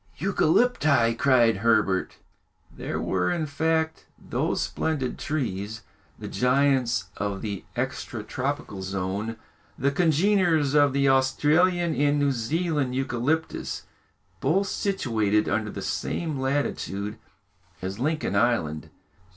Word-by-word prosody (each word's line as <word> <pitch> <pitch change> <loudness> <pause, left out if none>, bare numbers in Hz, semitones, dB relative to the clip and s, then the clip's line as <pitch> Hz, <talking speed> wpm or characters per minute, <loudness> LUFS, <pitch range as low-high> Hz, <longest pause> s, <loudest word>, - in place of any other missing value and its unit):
"Eucalypti!" 160 - +3
cried 120 -3 +3
Herbert. 105 -3 +2 0.6
They - - -5
were, 90 -1 0
in 170 -3 0
fact, 160 +2 -1
those - - -2
splendid 145 -6 -2
trees, 110 -7 -3 0.3
the - - -7
giants 125 -6 +1
of 100 0 -3
the 100 -3 -4
extra - - -3
tropical 95 - -3
zone, 95 +4 -3 0.4
the 140 +2 +1
congeners 165 -1 +2
of 145 -2 +4
the 140 0 +2
Australian 155 +6 +3
and 145 0 +2
New 145 -1 +2
Zealand 140 +2 -1
eucalyptus, 135 +5 -1 0.6
both 195 - +2
situated 110 - 0
under 110 -1 0
the - - -6
same 155 -5 -2
latitude 120 -6 -2 0.6
as 95 +3 -4
Lincoln 155 -6 -1
Island. 100 -9 +1
135 Hz, 110 wpm, -26 LUFS, 110-155 Hz, 0.6 s, of